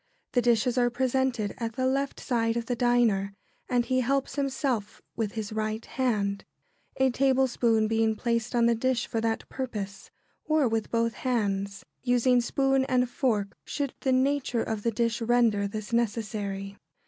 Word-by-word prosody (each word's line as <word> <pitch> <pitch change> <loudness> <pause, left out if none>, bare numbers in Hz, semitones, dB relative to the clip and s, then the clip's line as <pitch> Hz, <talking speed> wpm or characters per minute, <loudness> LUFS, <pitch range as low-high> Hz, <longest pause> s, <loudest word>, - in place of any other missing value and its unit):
The 245 - +2
dishes 240 +1 +2
are 245 0 +3
presented 250 -3 0
at 230 -1 -3
the 255 +2 -1
left 275 +1 0
side 230 -2 0
of 235 - -2
the 245 - -1
diner, 230 -5 +2 0.3
and 245 -1 +2
he 255 0 +1
helps 270 +2 0
himself 265 -6 -2 0.2
with 220 -3 -2
his 215 -1 -4
right 215 +1 -2
hand, 205 -6 -1 0.5
a 265 -1 +3
tablespoon 245 -4 +2
being 225 0 +2
placed 235 +1 -1
on 235 -1 +4
the 235 - +4
dish 240 +1 0
for 225 - -2
that 225 0 -1
purpose; 210 -7 -5 0.3
or 310 -4 +2
with 225 -1 -1
both 230 -1 +1
hands, 200 -5 -2 0.2
using 245 0 +3
spoon 270 +2 +2
and 250 -2 +1
fork, 215 -7 0
should 285 -3 -3
the 265 - 0
nature 260 -2 +1
of 220 -2 -3
the 230 - +1
dish 230 +1 -1
render 230 -3 +3
this 215 +2 -6
necessary. 205 -3 -2
235 Hz, 160 wpm, -27 LUFS, 215-255 Hz, 0.5 s, on